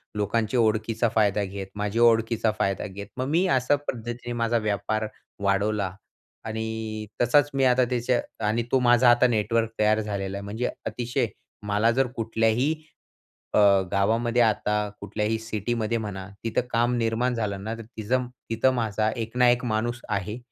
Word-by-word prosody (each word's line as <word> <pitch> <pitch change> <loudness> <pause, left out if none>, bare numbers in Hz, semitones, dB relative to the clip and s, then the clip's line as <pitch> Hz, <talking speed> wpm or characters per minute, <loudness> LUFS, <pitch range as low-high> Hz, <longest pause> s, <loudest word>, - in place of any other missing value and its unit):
लोकांची 110 +3 0
ओळखीचा 110 0 +1
फायदा 105 -2 +3
घेत, 95 0 -5
माझी 105 +2 -2
ओळखीचा 115 -1 +3
फायदा 100 0 0
घेत 100 0 -8
मग 130 - -1
मी 170 +5 +3
अशा 130 +3 +3
पद्धतीने 120 +1 -4
माझा 115 0 +1
व्यापार 110 0 -1 0.4
वाढवला. 100 -1 0 0.5
आणि 110 -1 -4 0.2
तसाच 140 +4 +4
मी 135 -1 +1
आता 125 0 +4
त्याचे 125 0 +1 0.3
आणि 110 +3 +1
तो 130 - +4
माझा 120 0 +5
आता 120 +1 +5
नेटवर्क 115 0 +1
तयार 110 0 +3
झालेला 100 -2 -3
आहे. 100 - -6
म्हणजे 110 +5 -2 0.2
अतिशय 120 -1 -1 0.4
मला 105 +3 +3
जर 130 +2 +2
कुठल्याही 115 +5 +1 0.8
अ, - - +3 0.3
गावामध्ये 115 +4 +2
आता 110 -2 +2 0.3
कुठल्याही 110 +1 -1
सिटीमध्ये 115 +1 -2
म्हणा 100 -4 -5 0.2
तिथं 115 +1 0
काम 120 +1 +2
निर्माण 120 +2 0
झालं 100 -4 -3
ना 110 +2 -3
तर 115 - -8 0.2
तिचं 125 +4 0 0.2
तिथं 115 +3 +3
माझा 110 -3 0
एक 115 0 -5
ना 125 -1 +6
एक 120 +1 +2
माणूस 120 +2 -1
आहे. 105 +2 -2
115 Hz, 155 wpm, -25 LUFS, 105-120 Hz, 0.8 s, ना